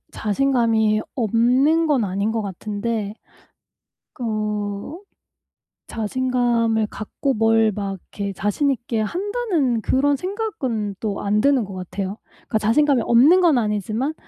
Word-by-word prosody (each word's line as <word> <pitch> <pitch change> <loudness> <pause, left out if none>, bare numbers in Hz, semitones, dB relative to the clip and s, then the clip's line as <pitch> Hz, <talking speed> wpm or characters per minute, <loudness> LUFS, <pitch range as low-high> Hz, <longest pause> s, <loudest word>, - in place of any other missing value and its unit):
자신감이 220 -2 +1
없는 255 +8 +2
건 270 -8 +2
아닌 200 +3 -1
것 225 -1 -1
같은데 205 +2 -4 1.1
어 210 - -3 0.9
자신감을 230 -1 0
갖고 265 +7 -3
뭘 225 0 +3
막 200 -1 -3 0.2
이렇게 200 -1 -3
자신 210 +9 0
있게 235 -3 -2
한다는 345 - -1
그런 280 +5 +2
생각은 270 - -3
또 205 -3 -3
안 210 +1 +1
드는 275 -4 +3
것 195 -1 -9
같아요. 190 +2 -5
그러니까 220 - -3
자신감이 255 +4 +3
없는 285 +11 +5
건 325 -8 +4
아니지만 215 - -1
225 Hz, 250 characters per minute, -21 LUFS, 210-270 Hz, 1.1 s, 없는